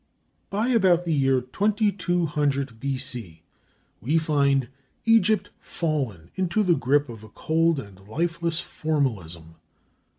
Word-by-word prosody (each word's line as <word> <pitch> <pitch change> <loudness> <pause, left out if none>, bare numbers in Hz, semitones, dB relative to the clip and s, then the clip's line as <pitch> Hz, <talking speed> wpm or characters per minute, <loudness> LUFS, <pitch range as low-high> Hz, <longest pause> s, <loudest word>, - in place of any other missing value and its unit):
By 215 +5 0
about 185 -7 +3
the 165 - 0
year 135 -3 +2
2200 165 - 0
B.C. 125 - -5 0.6
we 145 +10 +1
find 140 -5 +2 0.4
Egypt 220 -2 +3
fallen 130 - -3
into 190 +3 0
the 180 -3 +4
grip 145 +1 +2
of 115 -3 -10
a 110 - -12
cold 165 +5 +1
and 100 -7 -10
lifeless 170 +6 -1
formalism. 95 - -3
145 Hz, 110 wpm, -25 LUFS, 125-175 Hz, 0.6 s, the